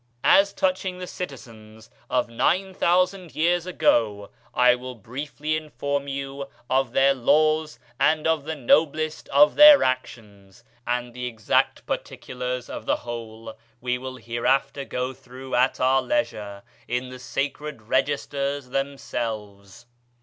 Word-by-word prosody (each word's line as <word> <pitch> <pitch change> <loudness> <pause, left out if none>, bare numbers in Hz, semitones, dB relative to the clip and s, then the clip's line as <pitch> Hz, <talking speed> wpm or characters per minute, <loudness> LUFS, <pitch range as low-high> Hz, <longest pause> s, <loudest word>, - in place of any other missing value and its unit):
As 200 0 +5
touching 185 -1 -1
the 180 - -6
citizens 110 -11 -9 0.2
of 125 -1 +1
9000 180 +6 +1
years 175 +2 +1
ago, 105 - +1 0.2
I 125 0 +5
will 125 +1 -6
briefly 145 +7 -4
inform 140 -1 -3
you 140 0 -5 0.2
of 130 -2 +1
their 135 +1 +4
laws 155 +4 +2 0.2
and 155 0 +2
of 160 -3 +1
the 160 0 -3
noblest 155 +3 +1
of 145 +2 +5
their 300 -1 +9
actions; 105 -4 -4 0.2
and 120 0 -2
the 125 0 -4
exact 110 -3 0
particulars 125 0 -4
of - - -8
the - - +3
whole 115 -1 -7 0.3
we 125 0 -2
will 130 0 -7
hereafter 130 +3 -1
go 125 0 -3
through 130 +1 -11
at 125 +2 +2
our 130 +1 +3
leisure, 105 - -2 0.2
in 125 +1 -2
the 130 0 -9
sacred 140 0 -4
registers 140 +2 -1
themselves. 115 -6 -5
130 Hz, 130 wpm, -24 LUFS, 120-150 Hz, 0.3 s, their